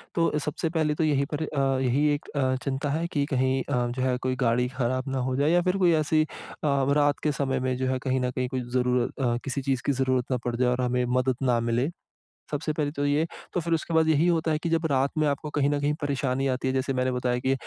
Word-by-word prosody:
तो 165 Hz, -1 st, +2 dB
सबसे 150 Hz, +2 st, -2 dB
पहले 155 Hz, -2 st, 0 dB
तो 160 Hz, -, 0 dB
यही 145 Hz, -3 st, +2 dB
पर 150 Hz, +2 st, -1 dB
अ, 135 Hz, -3 st, 0 dB
यही 135 Hz, +4 st, +2 dB
एक 145 Hz, -, -5 dB
अ, 130 Hz, -2 st, +1 dB
चिंता 140 Hz, +1 st, -2 dB
है 165 Hz, +3 st, -1 dB
कि 145 Hz, -4 st, -1 dB
कहीं 130 Hz, 0 st, +1 dB
अ, 125 Hz, -3 st, +1 dB
जो 125 Hz, +2 st, -3 dB
है 130 Hz, -1 st, +1 dB
कोई 130 Hz, 0 st, -1 dB
गाड़ी 125 Hz, +2 st, +2 dB
खराब 130 Hz, 0 st, -1 dB
ना 135 Hz, -, -2 dB
हो 130 Hz, -, -1 dB
जाए। 145 Hz, +3 st, +2 dB
या 175 Hz, +1 st, +4 dB
फिर 185 Hz, +2 st, 0 dB
कोई 180 Hz, -3 st, +4 dB
ऐसी 155 Hz, +1 st, +2 dB
अ, 155 Hz, -, -7 dB
व 140 Hz, 0 st, +2 dB
रात 145 Hz, -1 st, +2 dB
के 150 Hz, -, +2 dB
समय 135 Hz, -2 st, -1 dB
में 130 Hz, 0 st, -1 dB
जो 130 Hz, 0 st, -1 dB
है 130 Hz, 0 st, 0 dB
कहीं 130 Hz, -1 st, +1 dB
न 125 Hz, 0 st, 0 dB
कहीं 125 Hz, 0 st, -2 dB
कोई 130 Hz, -1 st, -2 dB
ज़रूर 125 Hz, 0 st, +2 dB, 0.2 s
अ, 120 Hz, 0 st, +1 dB
किसी 135 Hz, 0 st, -3 dB
चीज़ 130 Hz, -2 st, -1 dB
की 140 Hz, -, +2 dB
ज़रूरत 130 Hz, -2 st, +1 dB
ना 125 Hz, -, +2 dB
पड़ 120 Hz, -1 st, -1 dB
जाए 125 Hz, 0 st, +2 dB
और 125 Hz, +1 st, 0 dB
हमें 125 Hz, 0 st, +1 dB
मदद 130 Hz, 0 st, +1 dB
ना 125 Hz, -2 st, +3 dB
मिले। 120 Hz, +4 st, 0 dB, 0.6 s
सबसे 150 Hz, +1 st, -1 dB
पहले 150 Hz, -2 st, -1 dB
तो 145 Hz, -1 st, -2 dB
ये, 145 Hz, +3 st, +2 dB, 0.3 s
तो -, -, +1 dB
फिर 170 Hz, +1 st, -1 dB
उसके 165 Hz, +1 st, -2 dB
बाद 160 Hz, 0 st, +4 dB
यही 160 Hz, +2 st, +3 dB
होता 165 Hz, -2 st, +1 dB
है 155 Hz, -, +2 dB
कि 170 Hz, -, -3 dB
जब 165 Hz, 0 st, +1 dB
रात 135 Hz, +1 st, +2 dB
में 155 Hz, -, +3 dB
आपको 145 Hz, +1 st, -2 dB
कहीं 140 Hz, 0 st, +3 dB
न 145 Hz, -, 0 dB
कहीं 145 Hz, +1 st, +1 dB
परेशानी 135 Hz, -2 st, 0 dB
आती 130 Hz, +1 st, -3 dB
है। 130 Hz, -, 0 dB
जैसे 130 Hz, +1 st, 0 dB
मैंने 130 Hz, 0 st, 0 dB
बताया 125 Hz, 0 st, 0 dB
कि 130 Hz, +2 st, +1 dB
135 Hz, 270 wpm, -26 LUFS, 130-150 Hz, 0.6 s, या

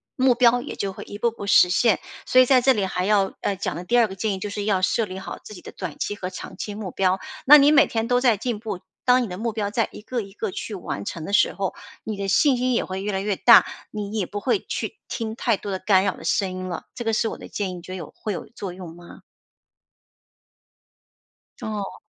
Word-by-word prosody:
目 260 Hz, -1 st, +4 dB
标 245 Hz, 0 st, +4 dB
也 -, -, -7 dB
就 195 Hz, -1 st, -3 dB
会 -, -, -8 dB
一 205 Hz, -, -9 dB
步 235 Hz, -, +2 dB
步 205 Hz, -, -8 dB
实 180 Hz, -2 st, +6 dB
现。 220 Hz, +2 st, +3 dB, 0.3 s
所 255 Hz, -, +6 dB
以 255 Hz, -, +6 dB
在 255 Hz, -1 st, +5 dB
这 265 Hz, +1 st, +5 dB
里 200 Hz, -4 st, 0 dB
还 180 Hz, -1 st, -2 dB
要， 200 Hz, -1 st, +2 dB
呃， 200 Hz, -, 0 dB
讲 190 Hz, -, -3 dB
的 175 Hz, -, -5 dB
第 240 Hz, +4 st, +2 dB
二 225 Hz, -, +4 dB
个 190 Hz, -, -8 dB
建 205 Hz, +1 st, -1 dB
议 190 Hz, -, -4 dB
就 205 Hz, +2 st, -4 dB
是 205 Hz, 0 st, -4 dB
要 195 Hz, -3 st, +1 dB
设 225 Hz, +4 st, +1 dB
立 190 Hz, -1 st, -7 dB
好 -, -, -7 dB
自 -, -, -10 dB
己 185 Hz, -, -11 dB
的 -, -, -10 dB
短 180 Hz, -6 st, -7 dB
期 205 Hz, -, -2 dB
和 185 Hz, -2 st, -5 dB
长 185 Hz, -, -9 dB
期 205 Hz, -, -5 dB
目 205 Hz, -3 st, -5 dB
标， 190 Hz, +1 st, +1 dB, 0.3 s
那 295 Hz, +3 st, +10 dB
你 285 Hz, +1 st, +6 dB
每 300 Hz, -, +6 dB
天 225 Hz, 0 st, -2 dB
都 245 Hz, 0 st, +3 dB
在 235 Hz, -5 st, +4 dB
进 230 Hz, -1 st, -3 dB
步， 215 Hz, -5 st, -5 dB, 0.2 s
当 250 Hz, 0 st, +4 dB
你 -, -, -3 dB
的 180 Hz, -2 st, -6 dB
目 230 Hz, +2 st, -2 dB
标 210 Hz, -2 st, -2 dB
在 230 Hz, -1 st, 0 dB
一 -, -, -10 dB
个 240 Hz, +2 st, -3 dB
一 195 Hz, -1 st, -10 dB
个 205 Hz, -, -4 dB
去 210 Hz, -, -6 dB
完 175 Hz, -, -5 dB
成 160 Hz, +6 st, -5 dB
的 200 Hz, -, -6 dB
时 -, -, +4 dB
候， 195 Hz, -2 st, -3 dB, 0.3 s
你 215 Hz, -2 st, -4 dB
的 200 Hz, 0 st, -3 dB
信 260 Hz, +6 st, +4 dB
心 255 Hz, 0 st, +1 dB
也 -, -, +1 dB
会 190 Hz, +1 st, -5 dB
越 205 Hz, +1 st, -2 dB
来 190 Hz, -, -1 dB
越 205 Hz, -1 st, -1 dB
大， 235 Hz, +4 st, +7 dB, 0.3 s
你 210 Hz, -1 st, -5 dB
也 200 Hz, -, 0 dB
不 205 Hz, -, -5 dB
会 265 Hz, -, +1 dB
去 430 Hz, -, -5 dB
听 225 Hz, -2 st, -4 dB
太 230 Hz, -4 st, +1 dB
多 205 Hz, -, -7 dB
的 190 Hz, -, -2 dB
干 190 Hz, -1 st, +3 dB
扰 195 Hz, -, 0 dB
的 -, -, -12 dB
声 195 Hz, -2 st, +1 dB
音 185 Hz, 0 st, -5 dB
了。 175 Hz, -, -5 dB
这 240 Hz, -, -5 dB
个 225 Hz, -, 0 dB
是 220 Hz, -, +1 dB
我 -, -, -5 dB
的 -, -, -10 dB
建 195 Hz, -3 st, -3 dB
议， -, -, -6 dB
你 175 Hz, -, -8 dB
觉 185 Hz, -, -11 dB
得 185 Hz, -, -4 dB
有 165 Hz, -, -9 dB
会 215 Hz, -, -4 dB
有 -, -, -6 dB
作 195 Hz, -6 st, -7 dB
用 175 Hz, -3 st, -9 dB
吗？ 175 Hz, 0 st, -14 dB, 2.4 s
哦。 210 Hz, -2 st, -4 dB
205 Hz, 290 characters per minute, -23 LUFS, 190-235 Hz, 2.4 s, 那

